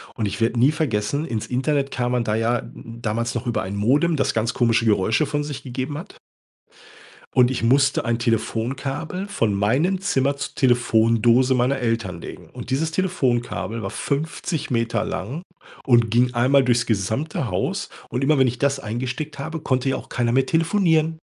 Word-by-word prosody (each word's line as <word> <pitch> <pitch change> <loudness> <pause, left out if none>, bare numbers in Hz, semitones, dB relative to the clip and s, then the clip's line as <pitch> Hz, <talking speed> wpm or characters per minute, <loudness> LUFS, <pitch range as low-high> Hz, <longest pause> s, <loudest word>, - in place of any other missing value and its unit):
Und 110 -3 -1
ich 100 - -4
werde 115 +1 +1
nie 130 +5 +5
vergessen, 140 -1 -1
ins 110 -8 -3
Internet 135 +2 0
kam 125 -1 -1
man 125 -1 +1
da 105 -1 0
ja 115 +1 +1
damals 115 0 -4
noch 120 - -3
über 120 - 0
ein 95 +2 -5
Modem, 145 +11 +2
das 140 - 0
ganz 115 +1 0
komische 115 -1 +2
Geräusche 110 +7 +2
von 145 0 -2
sich 145 -2 -6
gegeben 130 +3 -4
hat. 165 - -10 1.2
Und 125 -1 +5
ich 125 -3 -2
musste 135 +3 +3
ein 120 -1 0
Telefonkabel 135 - -2
von 115 - 0
meinem 135 - +1
Zimmer 140 -7 +1
zur - - -5
Telefondose 120 0 +3
meiner 125 +2 +1
Eltern 115 -8 -2
legen - - -10
und - - -8
dieses 160 +4 0
Telefonkabel 125 -10 -1
war - - -4
50 155 +2 -3
Meter 115 -1 0
lang 110 - -4 0.4
und 120 -4 +3
ging 125 +1 +3
einmal 130 +3 +4
durchs 120 -1 +2
gesamte 115 +6 -1
Haus. 90 0 -2 0.2
Und 125 - -3
immer 150 +1 +3
wenn 130 - +5
ich 120 0 -3
das 140 -1 +1
eingesteckt 130 +5 -4
habe, 160 +3 -4
konnte 130 -1 0
ja 130 - +1
auch - - -9
keiner 120 -1 0
mehr 130 +2 +2
telefonieren. 165 -1 +2
125 Hz, 175 wpm, -22 LUFS, 115-140 Hz, 1.2 s, nie